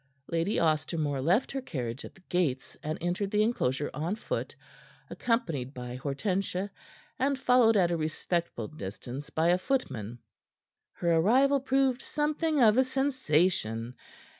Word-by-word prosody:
Lady 170 +5 0
Ostermore 155 -3 0
left 180 - +2
her 270 - -3
carriage 125 - -4
at - - -10
the 190 - -20
gates, 140 -8 -1
and 155 +1 -3
entered 180 +4 -1
the 210 +1 +3
enclosure 145 - 0
on 165 +7 -2
foot, - - -4 0.6
accompanied 165 - -1
by 125 -1 -6
Hortensia 185 +8 -2 0.5
and 275 +1 +1
followed 250 -4 +4
at 175 -3 +3
a 170 - +1
respectful 160 -5 -2
distance 130 +2 -7
by 160 +2 +1
a 180 +1 +4
footman. 120 - -2 0.8
Her 170 -1 +1
arrival 265 +11 +4
proved 265 -1 +1
something 305 +1 0
of 220 +2 +6
a - - +6
sensation. 180 - 0
175 Hz, 140 wpm, -29 LUFS, -, 0.8 s, of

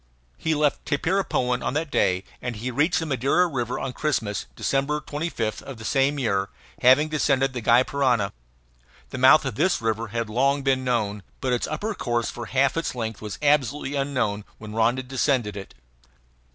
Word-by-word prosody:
He 160 -1 0
left 150 -1 +1
Tapirapoan 145 -6 0
on - - -2
that 155 -1 -2
day, 95 -8 +2 0.2
and 125 -2 -4
he 120 +5 -4
reached 150 +8 +2
the 165 - -1
Madeira 140 +5 +2
River 125 -7 -2
on 135 -1 -4
Christmas, 115 -10 -1
December 140 +2 0
25, 150 -7 -3
of 135 -3 -9
the 115 - -9
same 135 +3 +2
year, 100 -7 0 0.3
having 130 +5 +6
descended 135 -3 +1
the 125 - -4
Gy 120 +3 +5
Parana. 125 -8 +1 0.8
The 130 - -5
mouth 130 +4 +7
of 135 - -2
this 185 - +1
river 115 0 -1
had 115 +2 -3
long 135 +5 +1
been 135 -1 +1
known, 105 -5 -1 0.2
but 130 -1 0
its 120 - 0
upper 205 +9 -3
course 120 - -1
for 120 -1 -7
half 135 +3 +2
its 165 -5 -2
length 115 -3 -4
was 105 -2 -6
absolutely 145 -1 +2
unknown 130 -7 -1
when 105 -1 -9
Rondon 120 +4 +1
descended 125 -5 0
it. 95 -8 -9
130 Hz, 180 wpm, -24 LUFS, 115-145 Hz, 0.8 s, mouth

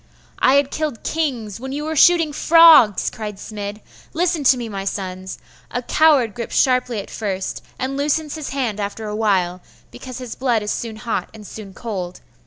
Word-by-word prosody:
'I 260 - +4
had 280 -1 +2
killed 305 -7 -3
kings 245 -10 -2
when 265 +2 -6
you 290 +2 -3
were 315 +1 -3
shooting 330 -1 +5
frogs,' 320 - +6
cried 210 -2 -6
Smid. 205 0 -7 0.3
'Listen 335 -2 0
to 255 - +6
me, 240 -2 -4
my 200 -3 -5
sons! 190 -1 -5 0.3
A 245 - -3
coward 280 -7 +3
grips 235 +1 -6
sharply 250 -3 +2
at 200 - -8
first, 195 -3 -4 0.2
and 265 +1 -3
loosens 295 +1 0
his 310 -3 -5
hand 245 -7 -2
after 205 +2 -4
a 210 - -4
while, 185 -5 0 0.3
because 255 -2 -9
his 250 -3 -6
blood 240 -5 0
is 210 - -2
soon 230 -2 -4
hot 225 +1 -3
and 215 -1 -11
soon 200 -2 -10
cold. 185 -6 -5
235 Hz, 185 wpm, -20 LUFS, 210-280 Hz, 0.3 s, frogs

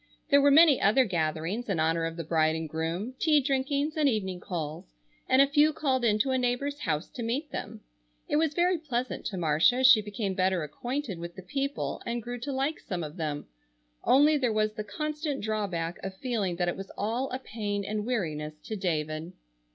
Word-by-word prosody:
There 280 0 +7
were 285 - +6
many 300 -1 +7
other 235 +6 +4
gatherings 170 +4 -2
in 185 -5 0
honor 165 +1 +1
of 165 +1 -4
the 165 - -3
bride 160 0 +2
and 160 0 -3
groom, 165 +9 -3
tea 305 -2 +4
drinkings 280 +3 0
and 300 -3 +3
evening 190 -6 -2
calls, 155 - -6 0.3
and 260 +1 +7
a - - +2
few 295 +2 +4
called 265 -4 0
in 215 -3 +3
to 265 - 0
a 260 - +2
neighbor's 255 +4 -1
house 155 - -1
to 245 - -8
meet 255 +6 -2
them. - - -6 0.5
It 295 - +1
was 310 -1 +1
very 355 0 +2
pleasant 255 -5 -3
to 195 - -4
Marcia 160 +7 +3
as 260 +1 +2
she 240 -4 +8
became 205 -1 -3
better 185 -2 +1
acquainted 240 - -4
with 170 0 -7
the 190 - -9
people 275 +8 -3
and 235 0 -3
grew 245 +1 -5
to 280 +4 -4
like 275 +4 -1
some 180 -7 -4
of 150 +3 -7
them, 150 -3 -3 0.6
only 295 +3 +5
there 250 -4 +1
was 215 0 +1
the 215 -1 -4
constant 300 +5 -3
drawback 195 -6 -2
of 190 0 -6
feeling 210 -7 -1
that 175 0 -1
it 175 - 0
was 195 0 -8
all 235 +6 -1
a 255 - -3
pain 205 -5 -4
and 210 +1 -2
weariness 155 -10 -3
to 220 - -5
David. 160 -3 -2
215 Hz, 205 wpm, -28 LUFS, 170-270 Hz, 0.6 s, she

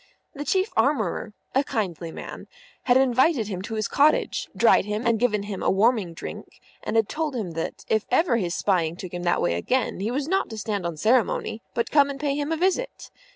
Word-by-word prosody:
The 290 -1 -6
Chief 380 +6 +1
Armourer, 220 - 0 0.2
a 270 - +3
kindly 175 - -3
man, - - -8 0.4
had 250 0 +5
invited 260 -2 +3
him 185 -3 -4
to 220 +3 -5
his 215 -1 -1
cottage, 300 +2 +2
dried 230 - +5
him 210 +3 -3
and 230 -2 +2
given 210 -4 +1
him 205 -2 -5
a - - +1
warming 200 -4 +2
drink, - - -9 0.2
and - - -4
had 225 -2 +3
told 310 -1 -3
him 210 -8 -3
that, 165 0 -5
if 220 -1 0
ever 255 0 +3
his 180 -5 -1
spying 170 -5 +1
took 180 -1 -8
him 175 - -4
that 175 0 +1
way - - +2
again, 235 - -1
he 205 +3 -1
was 275 +4 -2
not 385 +3 0
to 220 - -7
stand 205 -4 -2
on 165 -2 -5
ceremony, 225 +1 +1
but 235 0 -1
come 285 -2 +5
in - - -3
and 275 - -10
pay 285 -1 0
him 290 +2 -2
a 325 - 0
visit. 380 +9 -1
225 Hz, 220 wpm, -25 LUFS, 195-275 Hz, 0.4 s, had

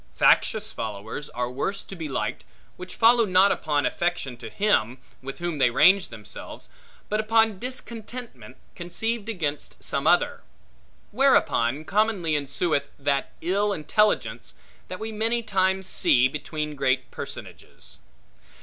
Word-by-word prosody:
Factious - - +3
followers 110 +7 -6
are 125 0 -3
worse 195 +10 -3
to 195 - -10
be 160 -4 -5
liked, 135 - -3 0.3
which 180 0 -9
follow 235 +1 +5
not 190 -1 +4
upon 145 -2 0
affection 175 -7 -1
to 120 - -9
him, 130 - +1 0.2
with 135 +1 -7
whom 170 -3 -3
they 125 - +5
range 185 +10 +5
themselves, 110 -3 -9 0.4
but 215 - -1
upon 220 -2 +2
discontentment 235 - -7 0.2
conceived 220 +6 -3
against 155 -9 -4
some - - -1
other; - - +3 0.7
whereupon 155 - +2
commonly 200 -4 +1
ensueth 145 +1 -1
that 140 -1 -1
ill 200 +4 +1
intelligence, 210 +6 0 0.3
that - - -7
we 220 0 -4
many 225 +2 0
times 190 -2 +1
see 125 -7 +4
between 150 +1 -5
great 130 -2 0
personages. - - -9
175 Hz, 130 wpm, -25 LUFS, 140-215 Hz, 0.7 s, follow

